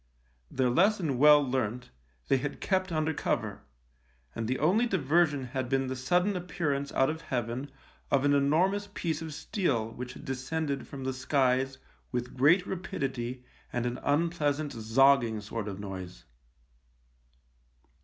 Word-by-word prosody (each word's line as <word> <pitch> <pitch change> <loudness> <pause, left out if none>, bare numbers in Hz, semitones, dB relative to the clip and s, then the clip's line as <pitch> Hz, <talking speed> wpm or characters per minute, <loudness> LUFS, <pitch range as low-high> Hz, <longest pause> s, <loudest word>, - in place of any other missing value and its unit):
Their 130 -2 +1
lesson 170 - +2
well 150 0 +7
learnt, 125 - -2 0.4
they 135 - +4
had 145 +2 -4
kept 185 -2 0
under 155 0 0
cover, - - -2 0.7
and 115 -1 -3
the 130 +2 0
only 195 +11 +3
diversion 155 - +2
had 130 0 -4
been 135 0 +1
the 130 - -2
sudden 180 +10 +1
appearance 150 -6 -2
out 135 +3 +3
of 160 +1 -7
heaven 125 +1 -3 0.4
of 140 0 +2
an 145 - +4
enormous 180 +9 +2
piece 165 -2 -2
of 160 -1 -5
steel 145 - -1
which 125 +2 -7
had - - -11
descended 140 +3 -3
from 135 -1 -7
the 130 0 -1
skies 130 0 +1 0.3
with 125 0 -3
great 160 +8 +4
rapidity 130 -9 -4 0.3
and 120 0 -1
an 125 +1 -2
unpleasant 150 -1 0
zogging 115 0 +3
sort 105 +1 -5
of 100 -1 -5
noise. 95 -3 -7
135 Hz, 145 wpm, -29 LUFS, 125-160 Hz, 0.7 s, well